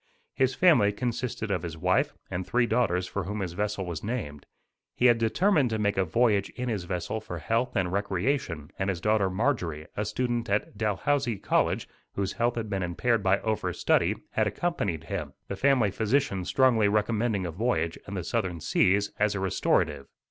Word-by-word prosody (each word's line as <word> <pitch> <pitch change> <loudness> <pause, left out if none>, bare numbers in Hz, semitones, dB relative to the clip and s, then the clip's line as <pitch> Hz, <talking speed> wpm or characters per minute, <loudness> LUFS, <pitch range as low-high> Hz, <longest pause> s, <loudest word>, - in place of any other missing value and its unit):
His 130 -1 +1
family 155 - +5
consisted 115 -1 -3
of 90 -4 0
his 80 -1 -6
wife, 90 +3 +2 0.2
and 90 - -2
three 120 +6 +1
daughters 110 -7 +1
for 100 0 -4
whom 105 +2 -4
his 90 -3 -3
vessel 105 0 -2
was 85 -3 -5
named. 105 - -4 0.5
He 125 - +1
had 120 -2 +6
determined 145 - +2
to 110 - -1
make 100 -1 +1
a 95 - +2
voyage 100 +2 +2
in 125 0 -3
his 100 -6 -2
vessel 90 +4 -3
for - - -6
health 115 +3 -1
and 90 -2 +1
recreation 95 - -1
and 95 0 0
his 90 -3 -1
daughter 105 +1 +2
Marjorie, 95 - -1
a 105 - -1
student 120 +1 -2
at 100 +1 -1
Dalhousie 115 +3 0
College, - - 0 0.3
whose 100 -1 -1
health 120 0 0
had 115 -2 -3
been 100 -2 -2
impaired 105 +6 0
by 95 0 +3
overstudy, 110 -2 +1 0.2
had - - +1
accompanied 100 - -2
him, - - -5
the 100 - -4
family 125 -2 +3
physician 110 -3 0
strongly 120 -4 +3
recommending 105 -1 +1
a 85 - -3
voyage 90 -3 0
in 100 - -5
the 90 - -3
southern 90 -3 -2
seas 100 +5 +2
as 105 0 +2
a - - -2
restorative. 75 -6 0
105 Hz, 185 wpm, -27 LUFS, 95-120 Hz, 0.5 s, had